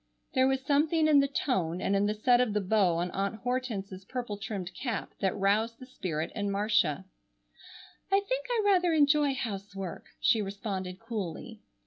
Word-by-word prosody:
There 260 Hz, 0 st, +4 dB
was 265 Hz, 0 st, +1 dB
something 310 Hz, +2 st, +3 dB
in 300 Hz, -2 st, +6 dB
the 280 Hz, -, +3 dB
tone, 185 Hz, -, -1 dB
and 195 Hz, -, 0 dB
in 200 Hz, +1 st, +2 dB
the 210 Hz, -, 0 dB
set 245 Hz, +3 st, +4 dB
of 235 Hz, -4 st, +1 dB
the 210 Hz, -, +2 dB
bow 195 Hz, -3 st, +2 dB
on 175 Hz, +1 st, -1 dB
Aunt 200 Hz, +2 st, -1 dB
Hortense's 220 Hz, -7 st, -3 dB
purple 245 Hz, 0 st, -4 dB
trimmed 195 Hz, -3 st, -5 dB
cap 235 Hz, -1 st, -4 dB
that 190 Hz, -2 st, 0 dB
roused 215 Hz, +4 st, +1 dB
the 255 Hz, -, -11 dB
spirit 165 Hz, -, -4 dB
in 205 Hz, -2 st, -2 dB
Marcia. 195 Hz, -5 st, +1 dB, 1.1 s
"I 390 Hz, -, +5 dB
think -, -, -1 dB
I 470 Hz, -3 st, +1 dB
rather 360 Hz, -4 st, +4 dB
enjoy 290 Hz, -2 st, +4 dB
housework," 195 Hz, -5 st, -5 dB
she 225 Hz, -, +3 dB
responded 195 Hz, -2 st, -4 dB
coolly. 220 Hz, 0 st, -5 dB
215 Hz, 170 wpm, -29 LUFS, 195-260 Hz, 1.1 s, in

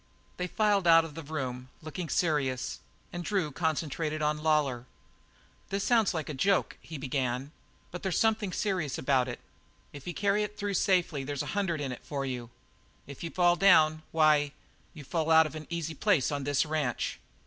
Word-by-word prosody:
They 180 Hz, -, -2 dB
filed 205 Hz, -2 st, +2 dB
out 165 Hz, -1 st, +7 dB
of 160 Hz, -, -9 dB
the 165 Hz, -, -7 dB
room, 130 Hz, -5 st, -5 dB
looking 160 Hz, +2 st, -5 dB
serious, 145 Hz, -7 st, 0 dB, 0.3 s
and 175 Hz, 0 st, -4 dB
Drew 185 Hz, -6 st, 0 dB
concentrated 155 Hz, 0 st, -1 dB
on 150 Hz, 0 st, 0 dB
Lawlor. 145 Hz, -6 st, +1 dB, 0.8 s
"This 195 Hz, 0 st, -1 dB
sounds 230 Hz, -4 st, +3 dB
like 160 Hz, -4 st, -3 dB
a 150 Hz, -, -4 dB
joke," 190 Hz, +8 st, +1 dB
he 160 Hz, -, -8 dB
began, 130 Hz, 0 st, -2 dB, 0.4 s
"but 180 Hz, -, -6 dB
there's 190 Hz, -3 st, -1 dB
something 215 Hz, -3 st, +2 dB
serious 180 Hz, -7 st, -1 dB
about 130 Hz, -2 st, +2 dB
it. 120 Hz, -, -5 dB, 0.5 s
If 145 Hz, +1 st, -10 dB
you 175 Hz, -, -4 dB
carry 205 Hz, +1 st, +2 dB
it 210 Hz, 0 st, -4 dB
through 205 Hz, -1 st, -2 dB
safely, 180 Hz, -8 st, +1 dB
there's 145 Hz, 0 st, -3 dB
a -, -, -5 dB
hundred 190 Hz, -6 st, 0 dB
in 135 Hz, -2 st, -2 dB
it 125 Hz, -, -8 dB
for 140 Hz, -2 st, -3 dB
you. 125 Hz, -3 st, -4 dB, 0.6 s
If 140 Hz, +3 st, -10 dB
you 165 Hz, -, -3 dB
fall 175 Hz, 0 st, +3 dB
down, 155 Hz, -5 st, +5 dB
why, 150 Hz, -2 st, +3 dB, 0.4 s
you 150 Hz, -, -9 dB
fall 160 Hz, +3 st, -1 dB
out 160 Hz, 0 st, +7 dB
of 155 Hz, -, -5 dB
an 155 Hz, -1 st, -8 dB
easy 165 Hz, -2 st, -3 dB
place 165 Hz, -4 st, +2 dB
on 140 Hz, -2 st, -2 dB
this 145 Hz, +1 st, +2 dB
ranch." 150 Hz, -6 st, -2 dB
155 Hz, 185 wpm, -29 LUFS, 140-180 Hz, 0.8 s, out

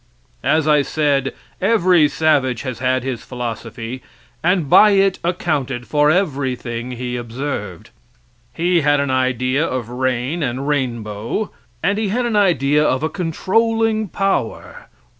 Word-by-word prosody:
As 155 Hz, -1 st, +2 dB
I 150 Hz, -1 st, +5 dB
said, 140 Hz, -1 st, 0 dB, 0.3 s
every 185 Hz, -6 st, +4 dB
savage 140 Hz, -6 st, +1 dB
has 130 Hz, -4 st, -5 dB
had 130 Hz, 0 st, 0 dB
his 130 Hz, -3 st, -3 dB
philosophy, 120 Hz, 0 st, -6 dB, 0.4 s
and 175 Hz, -2 st, +2 dB
by 210 Hz, +8 st, +7 dB
it 195 Hz, -1 st, +3 dB
accounted 145 Hz, -8 st, -1 dB
for 150 Hz, +1 st, +2 dB
everything 130 Hz, -8 st, -1 dB
he 125 Hz, 0 st, -4 dB
observed. 120 Hz, -, -5 dB, 0.6 s
He 175 Hz, 0 st, +1 dB
had 145 Hz, 0 st, +3 dB
an 140 Hz, -1 st, 0 dB
idea 130 Hz, +2 st, +1 dB
of 130 Hz, -7 st, -3 dB
rain 130 Hz, +5 st, -1 dB
and 135 Hz, 0 st, -2 dB
rainbow, 120 Hz, -, -2 dB, 0.3 s
and 200 Hz, +4 st, +1 dB
he 220 Hz, -, 0 dB
had 240 Hz, +5 st, 0 dB
an 235 Hz, -2 st, -1 dB
idea 150 Hz, -7 st, +3 dB
of 130 Hz, -1 st, +1 dB
a 155 Hz, -, +1 dB
controlling 220 Hz, +6 st, 0 dB
power. 195 Hz, +1 st, -2 dB
140 Hz, 135 wpm, -19 LUFS, 125-175 Hz, 0.6 s, by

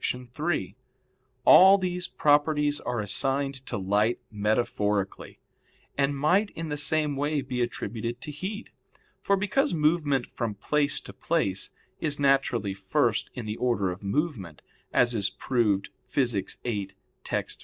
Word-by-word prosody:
3: 125 Hz, -, -2 dB, 0.7 s
All 190 Hz, +2 st, +9 dB
these 180 Hz, -1 st, -2 dB
properties 150 Hz, 0 st, +2 dB
are 120 Hz, -3 st, -2 dB
assigned 135 Hz, +6 st, -1 dB
to -, -, -3 dB
light 105 Hz, +4 st, +1 dB
metaphorically, 105 Hz, -2 st, -1 dB, 0.6 s
and 140 Hz, 0 st, +1 dB
might 180 Hz, +9 st, +3 dB
in 165 Hz, -1 st, -5 dB
the 145 Hz, -, -2 dB
same 150 Hz, 0 st, +1 dB
way 145 Hz, +2 st, 0 dB
be 125 Hz, -2 st, -3 dB
attributed 120 Hz, 0 st, -3 dB
to 150 Hz, -, -7 dB
heat. 195 Hz, -, -6 dB, 0.5 s
For 200 Hz, -, +1 dB
because 240 Hz, -, +1 dB
movement 150 Hz, -4 st, +2 dB
from 115 Hz, -3 st, -4 dB
place 145 Hz, +8 st, 0 dB
to -, -, -11 dB
place 125 Hz, -, -1 dB, 0.3 s
is 150 Hz, -2 st, -1 dB
naturally 135 Hz, -7 st, +2 dB
first 95 Hz, 0 st, 0 dB
in 120 Hz, -, -5 dB
the 105 Hz, 0 st, -4 dB
order 115 Hz, -7 st, +1 dB
of 90 Hz, -, -8 dB
movement 100 Hz, -, -3 dB, 0.3 s
as 120 Hz, 0 st, +3 dB
is 100 Hz, -4 st, +1 dB
proved 105 Hz, -6 st, 0 dB, 0.2 s
Phys. 120 Hz, -7 st, 0 dB
viii, 100 Hz, -5 st, -2 dB, 0.3 s
text. -, -, -3 dB
130 Hz, 135 wpm, -27 LUFS, 105-150 Hz, 0.7 s, All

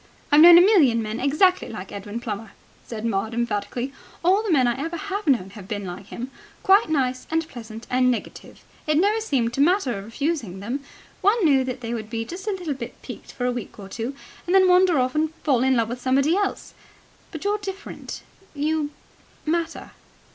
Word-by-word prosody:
"I've 295 Hz, +1 st, +7 dB
known 340 Hz, +1 st, +11 dB
a -, -, +9 dB
million 300 Hz, -, +5 dB
men 215 Hz, +2 st, -4 dB
exactly 305 Hz, +8 st, +2 dB
like 195 Hz, -4 st, -8 dB
Edwin 205 Hz, +3 st, -6 dB
Plummer," 215 Hz, -2 st, -6 dB, 0.3 s
said 225 Hz, -1 st, -5 dB
Maud 220 Hz, +1 st, -1 dB
emphatically. 235 Hz, +3 st, -2 dB, 0.3 s
"All 380 Hz, +4 st, +4 dB
the 435 Hz, -4 st, -2 dB
men 270 Hz, -6 st, +4 dB
I 240 Hz, +4 st, -1 dB
ever 330 Hz, +1 st, -3 dB
have 400 Hz, +2 st, -4 dB
known 230 Hz, -9 st, +2 dB
have 200 Hz, -2 st, -11 dB
been 205 Hz, -1 st, -4 dB
like 185 Hz, +2 st, -7 dB
him 250 Hz, +4 st, -6 dB, 0.3 s
quite 390 Hz, -1 st, +5 dB
nice 260 Hz, -4 st, 0 dB
and 325 Hz, 0 st, 0 dB
pleasant 225 Hz, -5 st, -9 dB
and 255 Hz, 0 st, +2 dB
negative. 245 Hz, -, -5 dB, 0.2 s
It 305 Hz, 0 st, +3 dB
never 415 Hz, +6 st, +3 dB
seemed 250 Hz, -, 0 dB
to 275 Hz, -, 0 dB
matter 290 Hz, -, +2 dB
refusing 230 Hz, -, -3 dB
them. 235 Hz, +8 st, -3 dB, 0.4 s
One 410 Hz, 0 st, +3 dB
knew 275 Hz, -4 st, +4 dB
that 255 Hz, 0 st, -5 dB
they 230 Hz, 0 st, -4 dB
would 215 Hz, -2 st, -5 dB
be 225 Hz, 0 st, -3 dB
just 370 Hz, -, -8 dB
a -, -, +1 dB
little 355 Hz, -6 st, -3 dB
bit 260 Hz, -3 st, -8 dB
piqued -, -, -9 dB
for 245 Hz, -, -3 dB
a 250 Hz, -, +2 dB
week 245 Hz, -3 st, -6 dB
or 200 Hz, -2 st, -9 dB
two 230 Hz, +7 st, -5 dB, 0.3 s
and 360 Hz, -, +2 dB
then 380 Hz, -1 st, +6 dB
wander 360 Hz, -2 st, +5 dB
off 255 Hz, 0 st, +1 dB
and 315 Hz, +1 st, 0 dB
fall 265 Hz, -6 st, +2 dB
in 260 Hz, 0 st, +3 dB
love 230 Hz, -2 st, +1 dB
with 245 Hz, +1 st, -5 dB
somebody 275 Hz, +6 st, +2 dB
else. 405 Hz, 0 st, -2 dB, 0.6 s
But 315 Hz, -5 st, -8 dB
you're 410 Hz, +1 st, 0 dB
different. 395 Hz, 0 st, -7 dB, 0.3 s
You... 300 Hz, +1 st, 0 dB, 0.6 s
matter." 330 Hz, +1 st, -2 dB
265 Hz, 200 wpm, -24 LUFS, 230-340 Hz, 0.6 s, known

